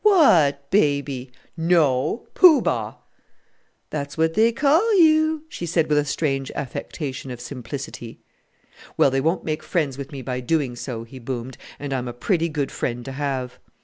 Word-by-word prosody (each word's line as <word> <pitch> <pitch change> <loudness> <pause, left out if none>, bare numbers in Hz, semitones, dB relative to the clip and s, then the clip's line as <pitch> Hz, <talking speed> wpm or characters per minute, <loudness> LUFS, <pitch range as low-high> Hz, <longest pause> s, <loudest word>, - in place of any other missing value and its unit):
"What 165 - +5
baby?" 140 -8 +1 0.2
"No, 165 - +2
Poo 340 -7 +7
Bah!" 110 -2 -1 1.0
"That's 140 +1 -4
what 160 0 +2
they 225 +4 +4
call 325 - +3
you," 315 -1 +4
she 175 - -6
said 165 -1 +1
with 150 -1 +4
a 145 - 0
strange 135 -2 -1
affectation 135 0 -5
of 125 -1 -6
simplicity. 120 -2 -7 0.8
"Well, 135 - +4
they 135 0 +1
won't 165 +5 0
make 155 -1 -2
friends 145 -6 -1
with 140 0 -7
me 135 -3 -7
by 125 -1 -3
doing 130 -1 -1
so," 120 -2 -5
he 130 +3 -11
boomed, 125 0 -5 0.2
"and 145 -1 -5
I'm 125 -2 -2
a 120 - -5
pretty 170 - 0
good 145 -3 -2
friend 120 0 -3
to 135 - -6
have." 130 -2 -3
140 Hz, 165 wpm, -23 LUFS, 130-170 Hz, 1.0 s, Poo